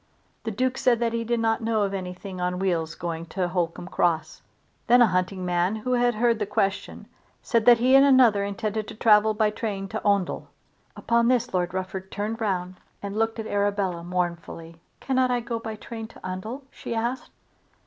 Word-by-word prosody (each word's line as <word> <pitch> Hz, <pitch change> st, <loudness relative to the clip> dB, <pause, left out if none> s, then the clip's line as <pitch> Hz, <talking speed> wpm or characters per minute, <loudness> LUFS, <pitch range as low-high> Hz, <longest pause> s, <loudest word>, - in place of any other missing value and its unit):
The -, -, -1 dB
Duke 255 Hz, +4 st, -1 dB
said 240 Hz, -2 st, +3 dB
that 235 Hz, -1 st, 0 dB
he 230 Hz, 0 st, -1 dB
did 235 Hz, +1 st, 0 dB
not 225 Hz, 0 st, +1 dB
know 225 Hz, -2 st, +1 dB
of 200 Hz, -1 st, -2 dB
anything 185 Hz, 0 st, -6 dB
on 180 Hz, 0 st, -1 dB
wheels 170 Hz, -4 st, -1 dB
going 165 Hz, -1 st, -5 dB
to 180 Hz, +2 st, -2 dB
Holcombe 175 Hz, 0 st, -2 dB
Cross. 160 Hz, -4 st, 0 dB, 0.5 s
Then 245 Hz, +2 st, +6 dB
a 240 Hz, -, +8 dB
hunting 185 Hz, 0 st, -1 dB
man 180 Hz, +3 st, +1 dB
who 250 Hz, +4 st, -2 dB
had 245 Hz, -1 st, +2 dB
heard 230 Hz, 0 st, +2 dB
the 210 Hz, -, -1 dB
question 195 Hz, -1 st, -2 dB, 0.4 s
said 230 Hz, -1 st, +1 dB
that 240 Hz, -1 st, +9 dB
he 250 Hz, +3 st, +3 dB
and 270 Hz, -, +8 dB
another 255 Hz, -7 st, +5 dB
intended 215 Hz, +1 st, -3 dB
to -, -, -8 dB
travel 215 Hz, -1 st, +4 dB
by 215 Hz, -1 st, +2 dB
train 205 Hz, -3 st, -4 dB
to 220 Hz, -, -4 dB
Oundle. 200 Hz, -3 st, 0 dB, 0.5 s
Upon 235 Hz, 0 st, +1 dB
this 250 Hz, -2 st, +1 dB
Lord 180 Hz, 0 st, -1 dB
Rufford 190 Hz, 0 st, -4 dB
turned 215 Hz, +3 st, -3 dB
round 185 Hz, -3 st, -2 dB, 0.3 s
and 200 Hz, 0 st, -4 dB
looked 225 Hz, +1 st, 0 dB
at 220 Hz, -, -4 dB
Arabella 200 Hz, -4 st, -1 dB
mournfully. 170 Hz, -2 st, -4 dB, 0.2 s
"Cannot 260 Hz, -1 st, +1 dB
I 245 Hz, -1 st, +1 dB
go 235 Hz, -1 st, -4 dB
by 220 Hz, -1 st, -6 dB
train 225 Hz, +1 st, -8 dB
to -, -, -14 dB
Oundle?" 215 Hz, +9 st, -5 dB
she 230 Hz, -, -6 dB
asked. 240 Hz, +3 st, -2 dB
210 Hz, 190 wpm, -25 LUFS, 185-230 Hz, 0.5 s, that